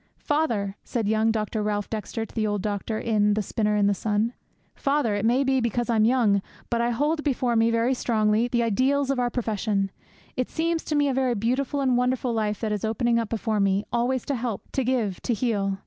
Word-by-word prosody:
'"Father!" 230 Hz, -10 st, -1 dB
said 230 Hz, -5 st, -2 dB
young 220 Hz, +1 st, +2 dB
Dr. 215 Hz, 0 st, -1 dB
Ralph 205 Hz, -1 st, -1 dB
Dexter 225 Hz, +1 st, -4 dB
to -, -, -17 dB
the 215 Hz, -1 st, 0 dB
old 205 Hz, -2 st, -2 dB
doctor 210 Hz, +1 st, -2 dB
in 210 Hz, -2 st, +2 dB
The 215 Hz, -, 0 dB
Spinner 210 Hz, +1 st, 0 dB
in 205 Hz, -1 st, +3 dB
the 200 Hz, -, +3 dB
Sun, 215 Hz, +4 st, 0 dB, 0.4 s
"father! 275 Hz, -6 st, 0 dB
it 205 Hz, 0 st, -1 dB
may 250 Hz, +4 st, +3 dB
be 265 Hz, -1 st, +2 dB
because 240 Hz, +1 st, 0 dB
I'm 220 Hz, -2 st, +3 dB
young, 225 Hz, -5 st, +3 dB, 0.3 s
but 235 Hz, 0 st, +1 dB
I 235 Hz, -, +1 dB
hold 295 Hz, +6 st, 0 dB
before 255 Hz, -4 st, 0 dB
me, 225 Hz, 0 st, +4 dB
very 230 Hz, +2 st, +2 dB
strongly, 220 Hz, -2 st, +1 dB
the 240 Hz, -1 st, +1 dB
ideals 265 Hz, +5 st, +1 dB
of 270 Hz, -, -1 dB
our 245 Hz, -1 st, +1 dB
profession. 210 Hz, -4 st, -1 dB, 0.4 s
It 255 Hz, -, -1 dB
seems 330 Hz, 0 st, -1 dB
to 305 Hz, -, -1 dB
me 290 Hz, -1 st, +3 dB
a 275 Hz, -, +1 dB
very 255 Hz, -2 st, +1 dB
beautiful 255 Hz, +6 st, 0 dB
and 255 Hz, -2 st, +2 dB
wonderful 250 Hz, 0 st, 0 dB
life 210 Hz, -2 st, -1 dB
that 220 Hz, -2 st, -1 dB
is 210 Hz, -2 st, -2 dB
opening 235 Hz, +2 st, +1 dB
up 225 Hz, -2 st, -3 dB
before 220 Hz, -1 st, -1 dB
me, 195 Hz, +1 st, +2 dB
always 245 Hz, +1 st, 0 dB
to 285 Hz, -, -1 dB
help, 235 Hz, -4 st, -4 dB
to 270 Hz, -, 0 dB
give, 230 Hz, -7 st, -1 dB
to 235 Hz, -, 0 dB
heal. 200 Hz, -4 st, 0 dB
230 Hz, 220 wpm, -25 LUFS, 210-255 Hz, 0.4 s, me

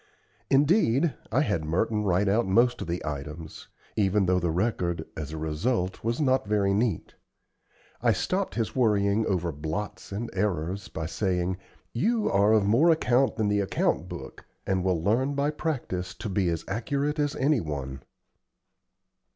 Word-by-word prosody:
Indeed, 145 Hz, -, +3 dB, 0.2 s
I 130 Hz, +6 st, +3 dB
had 100 Hz, -, 0 dB
Merton 105 Hz, +7 st, 0 dB
write 100 Hz, 0 st, +2 dB
out 105 Hz, +2 st, +2 dB
most 120 Hz, +6 st, +3 dB
of -, -, -4 dB
the 85 Hz, +1 st, -3 dB
items, 75 Hz, +2 st, -6 dB, 0.3 s
even 100 Hz, -1 st, +2 dB
though 90 Hz, 0 st, +3 dB
the 85 Hz, -1 st, 0 dB
record, 85 Hz, -3 st, -1 dB
as 75 Hz, -1 st, -5 dB
a 80 Hz, -, -5 dB
result, 90 Hz, +6 st, -1 dB
was 115 Hz, +4 st, -1 dB
not 130 Hz, -6 st, +2 dB
very 100 Hz, -2 st, +2 dB
neat. 105 Hz, -4 st, -1 dB, 0.9 s
I -, -, +4 dB
stopped 95 Hz, -, -1 dB
his 115 Hz, -4 st, -2 dB
worrying 105 Hz, -3 st, +2 dB
over 90 Hz, -3 st, 0 dB
blots 80 Hz, +10 st, -5 dB
and 110 Hz, +4 st, -4 dB
errors, 95 Hz, -1 st, -1 dB
by 80 Hz, -, -5 dB
saying, 90 Hz, +1 st, -1 dB, 0.4 s
"You 215 Hz, -, +1 dB
are 100 Hz, +2 st, +4 dB
of 110 Hz, -2 st, +4 dB
more 120 Hz, +12 st, +4 dB
account 135 Hz, -5 st, +3 dB
than 110 Hz, -2 st, 0 dB
the 105 Hz, 0 st, +2 dB
account 100 Hz, -, 0 dB
book, -, -, -8 dB, 0.2 s
and 95 Hz, -1 st, 0 dB
will 90 Hz, -4 st, 0 dB
learn 130 Hz, +8 st, +1 dB
by 140 Hz, +1 st, +1 dB
practice 120 Hz, -, -3 dB
to 110 Hz, -, -5 dB
be 95 Hz, -2 st, +1 dB
as 85 Hz, -1 st, -3 dB
accurate 140 Hz, +8 st, -1 dB
as 145 Hz, -1 st, 0 dB
any 140 Hz, 0 st, +2 dB
one." 70 Hz, -4 st, -5 dB
100 Hz, 160 wpm, -27 LUFS, 90-120 Hz, 0.9 s, I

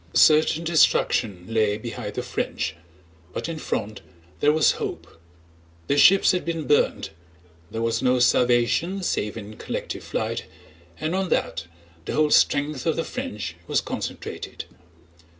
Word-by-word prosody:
Certain 155 Hz, +1 st, +5 dB
destruction 115 Hz, -, +2 dB
lay 110 Hz, -2 st, +1 dB
behind 115 Hz, +2 st, -6 dB
the -, -, -2 dB
French 80 Hz, -, -3 dB, 0.6 s
but -, -, -3 dB
in 165 Hz, -2 st, -5 dB
front 110 Hz, -7 st, -3 dB, 0.4 s
there 145 Hz, -, +4 dB
was 155 Hz, 0 st, +4 dB
hope. 85 Hz, -, -6 dB, 0.6 s
Their 140 Hz, +8 st, +1 dB
ships 195 Hz, +5 st, +6 dB
had 180 Hz, -, -1 dB
been 165 Hz, -2 st, -3 dB
burned, 145 Hz, -, +1 dB, 0.6 s
there 115 Hz, 0 st, -3 dB
was 115 Hz, 0 st, 0 dB
no 125 Hz, 0 st, +3 dB
salvation 125 Hz, +9 st, +2 dB
save 105 Hz, -10 st, -1 dB
in 105 Hz, 0 st, -9 dB
collective -, -, -5 dB
flight, -, -, -3 dB, 0.5 s
and 155 Hz, +2 st, -2 dB
on 190 Hz, -1 st, -1 dB
that 85 Hz, -, -1 dB, 0.4 s
the -, -, -3 dB
whole 150 Hz, -1 st, +2 dB
strength 145 Hz, 0 st, +2 dB
of 160 Hz, -, +2 dB
the 165 Hz, -, -1 dB
French 90 Hz, -6 st, -5 dB
was -, -, +2 dB
concentrated. -, -, -6 dB
130 Hz, 140 wpm, -24 LUFS, 110-160 Hz, 0.6 s, ships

